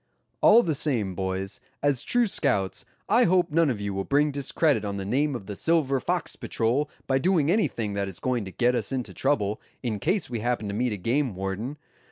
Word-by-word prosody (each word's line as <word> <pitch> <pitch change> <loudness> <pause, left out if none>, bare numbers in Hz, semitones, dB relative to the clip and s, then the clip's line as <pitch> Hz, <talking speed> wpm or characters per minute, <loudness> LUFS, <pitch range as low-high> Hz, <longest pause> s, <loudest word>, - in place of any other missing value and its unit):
"All 230 +3 +7
the 160 - 0
same, 125 - 0
boys, 95 +1 -3 0.2
as 145 -4 +2
true 245 -1 +2
scouts, 125 - 0 0.2
I 240 +3 +5
hope 180 -1 +2
none 165 0 +3
of 120 -5 -2
you 100 -1 -3
will 95 0 -2
bring 145 +6 +2
discredit 140 -2 +1
on 100 -1 -3
the 95 - -4
name 140 +7 +1
of 110 -5 -6
the 100 0 -6
Silver 145 -1 +2
Fox 175 +5 -2
Patrol 125 +6 0 0.2
by 135 0 +1
doing 165 -1 +2
anything 115 - 0
that 100 0 -1
is 95 - -8
going 125 -3 -1
to 95 - -7
get 120 +5 +2
us 125 - -2
into 130 -3 -3
trouble, 110 -7 0 0.2
in 110 -4 -2
case 185 - 0
we 120 -2 -4
happen 120 -1 -1
to - - -3
meet 120 +3 0
a 105 - -3
game 120 +3 0
warden. 95 +9 -4
125 Hz, 215 wpm, -26 LUFS, 100-150 Hz, 0.2 s, All